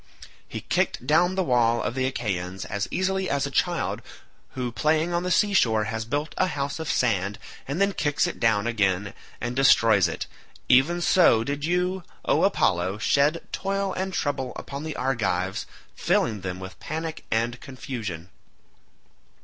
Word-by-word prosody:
He -, -, -6 dB
kicked -, -, -1 dB
down 175 Hz, +6 st, +3 dB
the 190 Hz, -, +1 dB
wall 120 Hz, -5 st, +3 dB
of -, -, -2 dB
the 130 Hz, 0 st, 0 dB
Achaeans 95 Hz, -7 st, -3 dB
as 100 Hz, 0 st, -3 dB
easily 190 Hz, 0 st, 0 dB
as 140 Hz, -1 st, 0 dB
a -, -, -4 dB
child -, -, 0 dB, 0.5 s
who 125 Hz, -2 st, -3 dB
playing 155 Hz, +7 st, +1 dB
on 170 Hz, -, +1 dB
the 180 Hz, -, -2 dB
sea 205 Hz, +3 st, +3 dB
shore 110 Hz, -, +3 dB
has 110 Hz, +1 st, -3 dB
built 145 Hz, +6 st, -2 dB
a 185 Hz, -, +3 dB
house 140 Hz, -2 st, -3 dB
of 160 Hz, -3 st, -2 dB
sand 100 Hz, -4 st, +1 dB, 0.3 s
and 140 Hz, +6 st, -3 dB
then 200 Hz, 0 st, +2 dB
kicks 150 Hz, -5 st, +1 dB
it -, -, -4 dB
down 110 Hz, -2 st, +2 dB
again 100 Hz, -3 st, 0 dB, 0.3 s
and 120 Hz, 0 st, -3 dB
destroys 115 Hz, -7 st, +5 dB
it—even 150 Hz, +8 st, 0 dB
so 170 Hz, -11 st, +5 dB
did 145 Hz, +3 st, -3 dB
you, 180 Hz, +2 st, 0 dB, 0.2 s
O -, -, +2 dB
Apollo, 90 Hz, +3 st, +1 dB
shed 145 Hz, +8 st, +2 dB
toil 195 Hz, 0 st, -1 dB
and 190 Hz, +1 st, -2 dB
trouble 140 Hz, -7 st, -2 dB
upon 140 Hz, 0 st, -6 dB
the 155 Hz, -1 st, -5 dB
Argives, 95 Hz, -8 st, -1 dB, 0.3 s
filling 110 Hz, -4 st, 0 dB
them 90 Hz, -1 st, -4 dB
with 95 Hz, 0 st, -9 dB
panic 160 Hz, +1 st, -5 dB
and 115 Hz, +2 st, 0 dB
confusion. 105 Hz, -, -6 dB
130 Hz, 160 wpm, -25 LUFS, 110-160 Hz, 0.5 s, destroys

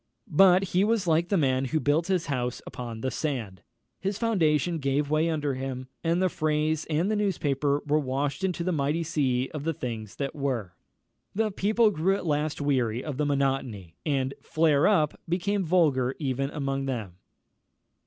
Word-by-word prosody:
But 185 Hz, +3 st, +6 dB
he 185 Hz, +2 st, +2 dB
was 215 Hz, -2 st, +1 dB
like 170 Hz, +1 st, +2 dB
the 200 Hz, -, +2 dB
man 135 Hz, -4 st, +2 dB
who 155 Hz, +5 st, 0 dB
built 155 Hz, +3 st, +1 dB
his 185 Hz, -3 st, +1 dB
house 125 Hz, -3 st, -2 dB
upon 115 Hz, -3 st, -7 dB
the 130 Hz, -, -1 dB
sand; 115 Hz, -, -3 dB, 0.4 s
his 195 Hz, +1 st, -2 dB
foundation 170 Hz, -, +1 dB
gave 140 Hz, +1 st, 0 dB
way 155 Hz, +2 st, +2 dB
under 150 Hz, -3 st, -1 dB
him, 130 Hz, 0 st, -5 dB
and 165 Hz, +1 st, +1 dB
the 185 Hz, -, +3 dB
phrase 155 Hz, -1 st, 0 dB
and 165 Hz, +6 st, +1 dB
the -, -, +1 dB
newspaper 145 Hz, -8 st, 0 dB
were 150 Hz, +1 st, +2 dB
washed 140 Hz, +3 st, -2 dB
into 180 Hz, -2 st, -1 dB
the 185 Hz, -, 0 dB
mighty 150 Hz, +1 st, 0 dB
sea 135 Hz, -5 st, 0 dB
of 150 Hz, -2 st, -4 dB
the 165 Hz, 0 st, -1 dB
things 110 Hz, -6 st, -5 dB
that 140 Hz, -1 st, -3 dB
were. 125 Hz, -, -2 dB, 0.6 s
The 215 Hz, 0 st, +1 dB
people 215 Hz, +3 st, +3 dB
grew 190 Hz, +2 st, +1 dB
at 195 Hz, -, -5 dB
last 150 Hz, -1 st, 0 dB
weary 130 Hz, -5 st, 0 dB
of 150 Hz, -4 st, -5 dB
the 150 Hz, 0 st, 0 dB
monotony, 135 Hz, -, -1 dB
and 135 Hz, -3 st, 0 dB
"flare 155 Hz, -2 st, +3 dB
up" 155 Hz, -8 st, +2 dB
became 195 Hz, +3 st, 0 dB
vulgar 145 Hz, -7 st, +2 dB
even 135 Hz, -2 st, -1 dB
among 135 Hz, -2 st, -2 dB
them. 110 Hz, -9 st, -4 dB
150 Hz, 175 wpm, -27 LUFS, 135-170 Hz, 0.6 s, But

